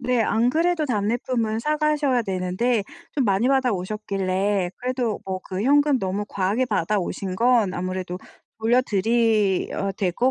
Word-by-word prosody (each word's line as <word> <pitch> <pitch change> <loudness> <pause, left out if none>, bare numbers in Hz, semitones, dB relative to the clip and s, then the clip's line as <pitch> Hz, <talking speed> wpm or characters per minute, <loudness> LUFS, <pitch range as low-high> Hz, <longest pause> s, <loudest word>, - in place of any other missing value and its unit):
네. 250 -2 +1
안 225 +2 +2
그래도 325 +2 +1
답례품은 225 0 -1
사가셔야 300 -2 +1
되는데 195 +3 -1 0.3
좀 275 - 0
많이 200 +3 +2
받아 265 -3 +2
오셨길래 195 -1 -1
그래도 250 -3 -2
뭐 190 -1 -4
그 190 +1 -3
현금 285 +2 +4
너무 195 0 -2
과하게 200 +6 0
받아오신 195 -2 -1
건 230 -2 +3
아무래도 185 0 -4 0.4
돌려드려야 220 -4 +1
될 185 -1 -1
것 250 +8 +2
220 Hz, 310 characters per minute, -23 LUFS, 190-250 Hz, 0.4 s, 현금